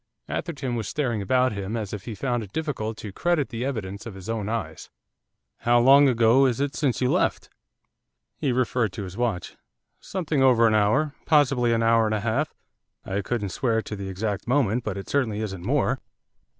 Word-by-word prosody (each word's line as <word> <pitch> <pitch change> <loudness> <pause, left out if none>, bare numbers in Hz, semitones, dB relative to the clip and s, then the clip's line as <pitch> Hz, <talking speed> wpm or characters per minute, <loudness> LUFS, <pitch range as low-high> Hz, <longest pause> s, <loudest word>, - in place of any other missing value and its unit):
Atherton 140 -7 -3
was 115 -3 -2
staring 120 -5 -1
about 125 +6 +2
him 100 +2 -4
as 105 -3 -5
if 100 -2 -6
he 115 - -5
found 120 0 -1
it 100 -3 -9
difficult 120 -8 -3
to 105 - -7
credit 170 - 0
the 120 -1 -4
evidence 110 -6 -4
of 110 - -8
his 95 +2 -9
own 110 -2 -2
eyes. 80 -9 -4 0.7
'How 120 0 +3
long 135 +3 +7
ago 120 +2 +4
is 125 -1 -1
it 140 0 -1
since 135 -5 0
you 125 - +2
left?' - - 0 0.8
He 140 - -1
referred 120 -4 0
to 100 - -5
his 95 -1 -8
watch. 115 -5 -2 0.4
'Something 165 -7 -2
over 125 -3 +5
an 110 - +4
hour, 110 +8 +2
possibly 135 -6 +3
an 115 0 +2
hour 115 -1 +4
and 110 - 0
a 105 - -2
half; 120 +7 0 0.5
I 100 +1 -2
couldn't 105 0 -2
swear 110 +2 0
to 105 - -6
the 100 -1 -6
exact 100 +2 -3
moment, 125 -3 +2
but 105 -4 -3
it 95 - -7
certainly 115 -7 0
isn't 95 -5 -4
more. - - +1
115 Hz, 195 wpm, -25 LUFS, 105-130 Hz, 0.8 s, long